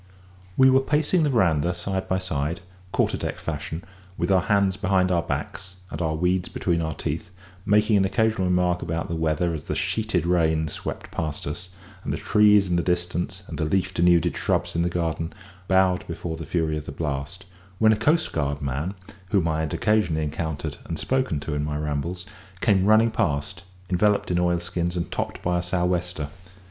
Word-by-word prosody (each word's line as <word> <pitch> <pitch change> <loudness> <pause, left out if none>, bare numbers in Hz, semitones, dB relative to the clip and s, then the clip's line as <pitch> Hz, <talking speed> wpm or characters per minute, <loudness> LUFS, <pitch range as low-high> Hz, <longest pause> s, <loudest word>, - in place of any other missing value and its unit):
We 130 0 +7
were 130 - +6
pacing 150 +5 +2
the 150 - +3
verandah 85 - +2
side 95 +2 -3
by 95 - +2
side, 85 -1 -2 0.3
quarter 100 - +1
deck - - -3
fashion, 80 +3 -5 0.3
with - - 0
our 95 -1 +5
hands 100 -1 +2
behind 95 -2 +2
our 85 -2 +3
backs 95 +2 -4 0.2
and - - -4
our 80 -2 0
weeds 90 +2 +1
between 85 -2 0
our 80 -2 -2
teeth, 80 +8 -4 0.4
making 105 +1 +4
an 95 - +3
occasional 110 -2 +1
remark 90 -1 +2
about 85 0 -3
the 85 - -2
weather 80 +1 0
as 75 -3 -5
the - - -2
sheeted 110 -7 0
rain 80 -3 +2
swept - - -6
past 80 -3 -3
us, 75 +6 -5 0.3
and - - -3
the - - -1
trees 105 -2 +5
in 90 -1 +1
the - - +2
distance 90 +2 -2
and - - -7
the - - +1
leaf 95 +3 0
denuded 85 -1 +3
shrubs - - 0
in 85 - +2
the 85 - +1
garden 80 -1 -2 0.3
bowed 95 -1 +3
before 85 0 -4
the 80 -2 -7
fury 80 -2 0
of 75 - -11
the - - -4
blast, 75 +5 -4 0.3
when 110 +1 +5
a - - +2
coastguard 105 - +1
man, 75 +7 -3 0.3
whom 95 -5 +2
I 80 -1 0
had 80 -2 -2
occasionally 90 -8 +2
encountered 80 +1 -3
and 80 - -4
spoken 130 - 0
to 75 - -4
in 75 0 -1
my 75 0 -2
rambles, 75 +4 -3 0.3
came 95 -3 +3
running 110 +2 +5
past, 70 -7 -1 0.3
enveloped 100 +2 +2
in 90 - +2
oilskins 85 0 0
and 85 - -3
topped - - -3
by 90 0 +1
a - - -1
sou' 90 0 0
wester. 90 -4 -1
90 Hz, 190 wpm, -25 LUFS, 80-95 Hz, 0.4 s, We